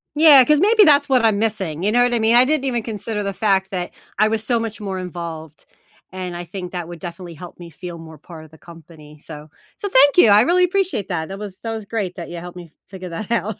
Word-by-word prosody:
Yeah, 295 -4 +8
'cause 300 -1 +3
maybe 425 +3 +5
that's 290 -3 +4
what 250 -3 +3
I'm 210 -2 +2
missing, 190 -8 -2
you 210 - +1
know 245 +1 +3
what 245 0 +1
I 235 - +1
mean? 225 +2 +3
I 250 +1 +6
didn't 295 -1 0
even 240 -4 -2
consider 210 -1 -5
the 200 0 -3
fact 195 -2 0
that 180 -2 -4 0.3
I 215 - +4
was 220 0 -2
so 235 +1 0
much 225 -1 -5
more 195 -2 -5
involved, 165 -3 -8 0.5
and 180 -2 -6
I 175 - -6
think 180 +1 -8
that 175 -2 -5
would 175 -1 -10
definitely 170 0 -9
help 175 +2 -12
me 170 -1 -11
feel 170 +2 -9
more 160 -2 -13
part 160 -1 -12
of 155 - -19
the 160 - -18
company, 160 -2 -15
so 150 0 -12 0.3
so 405 - -5
thank 285 -1 +5
you, 225 - +7
I 205 +1 +6
really 360 +6 +3
appreciate 360 - -2
that. 160 -1 -3
That 195 - -7
was 200 -3 -8
that 225 - -5
was 220 -2 -6
great 200 -5 -4
that 170 - -8
you 175 - -7
helped 175 +1 -9
me 170 -3 -11 0.2
figure 185 -2 -9
that 190 +7 -7
out. 220 -3 -1
195 Hz, 260 wpm, -20 LUFS, 175-230 Hz, 0.5 s, Yeah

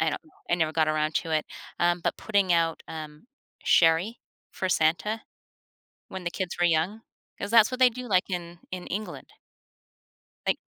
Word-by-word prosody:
I 160 -2 +1 0.3
I - - +5
never 160 -2 +1
got 155 -1 +2
around 155 0 0
to 165 - -2
it. 155 -1 +1 0.3
Um, 175 0 +2
but - - -1
putting 200 -4 +2
out, 165 -1 +1
um, 155 +3 -8 0.4
sherry 170 +7 +4 0.3
for 185 - -2
Santa 175 +6 +1 0.9
when 190 -1 -7
the 175 - -1
kids 185 -1 -4
were 175 - +2
young, 175 +7 +1 0.4
'cause 200 - -4
that's 230 0 +6
what 255 - -4
they 250 -1 +7
do, 250 +1 -7
like, 185 0 +2
in 175 -1 -5
in 185 -1 -6
England. 210 +3 -5 1.2
Like, - - +2
175 Hz, 170 wpm, -27 LUFS, 160-205 Hz, 1.2 s, they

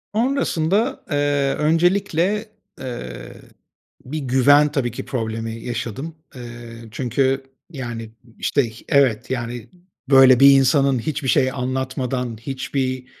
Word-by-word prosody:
Sonrasında, 230 - 0
eee, 145 -1 +1
öncelikle, 175 +5 +1 0.3
eee, 90 - -7 0.7
bir 150 +5 -4
güven, 145 +2 +4
tabii 135 -5 -1
ki, 120 - -7
problemi 115 -2 -3
yaşadım. 120 +6 -5 0.2
Eee, 125 - -8 0.5
çünkü, 130 +3 0 0.3
yani, 120 -6 -6 0.3
işte, 140 -5 +1
h 110 - -15
evet, 130 -6 +2
yani, 120 -2 -4 0.4
böyle, 135 -2 +7
bir 140 +1 +9
insanın 135 -1 +3
hiçbir 145 +2 -3
şey 130 0 +3
anlatmadan, 130 -2 -3
hiçbir 130 0 -3
135 Hz, 110 wpm, -21 LUFS, 125-145 Hz, 0.7 s, bir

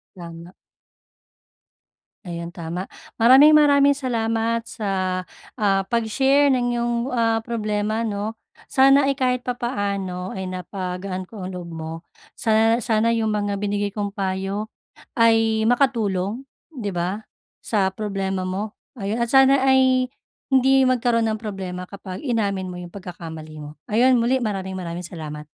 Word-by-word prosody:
Tama. 170 -1 -10 1.7
Ayan, 170 -1 -5
tama. 175 +2 -6 0.3
Maraming-maraming 285 +3 +7
salamat 230 -3 -1
sa, 185 -4 -2 0.3
ah, 200 -4 +2
pagshare 265 +6 +2
ng 250 -2 +2
'yung, 240 0 0 0.2
ah, 225 -1 +2
problema 215 -1 -1
'no? 215 0 -3 0.3
Sana 275 +1 +5
ay 275 - +2
kahit 250 -2 -1
papaano 200 -7 -3
ay 190 -1 -4
napagaan 185 0 -5
ko 200 -5 -7
ang 185 - -6
loob 175 -1 -7
mo. 160 -1 -6 0.4
Sana 225 +1 +2
sana 225 +1 +2
'yung 220 -1 0
mga 205 -1 -1
binigay 205 0 -2
kong 205 -1 -2
payo 195 +1 -3 0.5
ay 225 -1 +3
makatulong, 230 -3 +1 0.2
'di 230 - -5
ba, 185 +5 -3 0.4
sa 200 -4 +1
problema 195 -2 -3
mo. 200 +3 -4 0.2
Ayun 200 +3 -2
at 235 0 -1
sana 270 0 +6
ay 260 -1 +4 0.5
hindi 265 +1 +5
magkaroon 240 -2 +2
ng 215 - -3
problema 185 -4 -6
kapag 190 -1 -8
inamin 200 -7 -1
mo 180 - -7
'yung 175 -1 -9
pagkakamali 165 -5 -8
mo. 150 0 -8 0.2
Ayun 245 +4 +4
muli, 255 +3 +2
maraming 195 -5 -3
maraming 175 -1 -5
salamat. 150 -3 -7
210 Hz, 130 wpm, -22 LUFS, 185-240 Hz, 1.7 s, Maraming-maraming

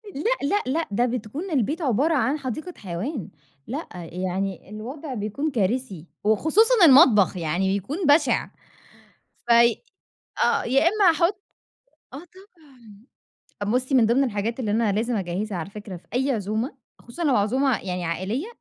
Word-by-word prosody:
لأ، 425 - -1
لأ، 410 +6 +1
لأ، 315 +6 -1
ده 240 +5 +2
بتكون 250 - -4
البيت 295 - 0
عبارة 280 +4 +1
عن 280 +2 +1
حديقة 310 +7 -5
حيوان، 200 - -5 0.4
لأ، 285 +8 -5 0.2
يعني 185 +1 -4
الوضع 260 +7 -7
بيكون 240 +8 -3
كارثي 205 - -2 0.2
وخصوصًا 360 - +4
المطبخ، 225 - +6
يعني 175 +3 -1
بيكون 275 - -6
بشع، 290 0 +3 1.0
فاي 235 0 +4 0.6
آه، - - +1
يا 265 +3 +2
إمّا 405 -3 +4
هاحط 350 +5 0 0.7
آه - - -6 1.4
طبعًا، 205 +1 -2
بُصّي 255 +2 0
من 235 -4 +5
ضمن 255 +4 +3
الحاجات 230 +2 -3
اللي 215 -4 -2
أنا 220 -1 +1
لازم 230 +3 -1
أجهّزها 190 +1 -3
على 170 +4 -6
فكرة 205 -3 -8
في 170 - -16
أي 265 +2 +1
عزومة، 220 - -3 0.2
خصوصًا 325 +8 -7
لو 275 -4 +3
عزومة 250 +5 +1
يعني 180 -2 -4
عائلية، 190 - -3
240 Hz, 145 wpm, -24 LUFS, 205-285 Hz, 1.4 s, المطبخ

